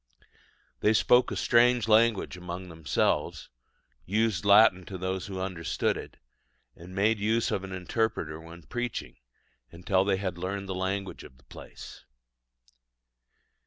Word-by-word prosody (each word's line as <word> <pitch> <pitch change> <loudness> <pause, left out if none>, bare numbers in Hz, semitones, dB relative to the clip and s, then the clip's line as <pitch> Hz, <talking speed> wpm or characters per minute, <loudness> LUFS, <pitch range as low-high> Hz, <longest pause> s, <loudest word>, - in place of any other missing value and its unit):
They 105 - +3
spoke 125 +3 +4
a - - -4
strange 120 -1 +3
language 110 -3 +3
among 90 +1 -7
themselves, 80 -5 -1 0.5
used 105 -1 0
Latin 100 -2 +6
to 95 - -6
those 95 +1 -3
who 95 -2 -6
understood 90 -4 -1
it, - - -9 0.6
and 90 +2 -12
made 105 +2 +2
use 110 +3 +1
of 95 - -2
an 95 - -7
interpreter 90 -4 -2
when 85 +1 -12
preaching, 120 +7 -5 0.5
until 90 +3 0
they 95 -1 +1
had 95 -3 -4
learned 100 +2 -4
the 95 - -3
language 95 +1 -3
of 65 - -14
the 65 - -25
place. - - -12
95 Hz, 135 wpm, -28 LUFS, 90-110 Hz, 0.6 s, Latin